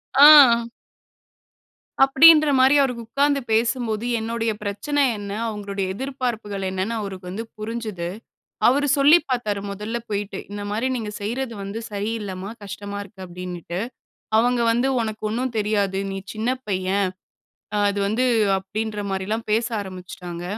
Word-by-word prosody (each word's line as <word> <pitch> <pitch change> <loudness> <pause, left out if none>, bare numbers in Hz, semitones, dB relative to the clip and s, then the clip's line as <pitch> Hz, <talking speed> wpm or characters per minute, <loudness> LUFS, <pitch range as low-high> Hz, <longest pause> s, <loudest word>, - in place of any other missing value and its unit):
ஆ, 275 -5 +9 1.4
அப்படின்ற 305 +3 +7
மாரி 265 +3 +6
அவருக்கு 245 -4 -1
உக்காந்து 280 +3 +2
பேசும்போது, 230 0 0
என்னுடைய 225 0 -1
பிரச்சனை 210 +9 -1 0.2
என்ன? 200 -1 -6 0.2
அவுங்களுடைய 200 -2 -3
எதிர்பார்ப்புகள் 235 -5 -4
என்னென்னு, 190 +5 -2
அவருக்கு 190 -2 -7
வந்து 215 +5 -4
புரிஞ்சது. 215 -5 -4 0.6
அவரு 285 +4 +3
சொல்லி 290 +5 +7
பாத்தாரு 215 -5 -1
மொதல்ல 210 +4 -4
போயிட்டு. 205 -1 -3
"இந்த 205 0 -5
மாரி 225 +5 -1
நீங்க 215 -3 -4
செய்றது 235 +2 -3
வந்து 200 +3 -5
சரியில்லம்மா. 205 -2 -4
கஷ்டமா 205 0 -6
இருக்கு." 200 -2 -12
அப்டின்னுட்டு. 175 -1 -6 0.6
அவங்க 245 +1 +2
வந்து 240 +4 +2
"உனக்கு 220 -1 -4
ஒண்ணும் 245 +3 -2
தெரியாது. 205 -2 0
நீ 195 - -4
சின்ன 220 +2 -3 0.2
பையன்". 190 0 0 0.8
அது 200 0 -1
வந்து 235 +5 +1 0.3
அப்படின்ற 210 +2 -4
மாரிலாம் 210 +4 -3
பேச 225 +2 +2
ஆரம்பிச்சுட்டாங்க. 180 -2 -8
215 Hz, 125 wpm, -23 LUFS, 200-240 Hz, 1.4 s, ஆ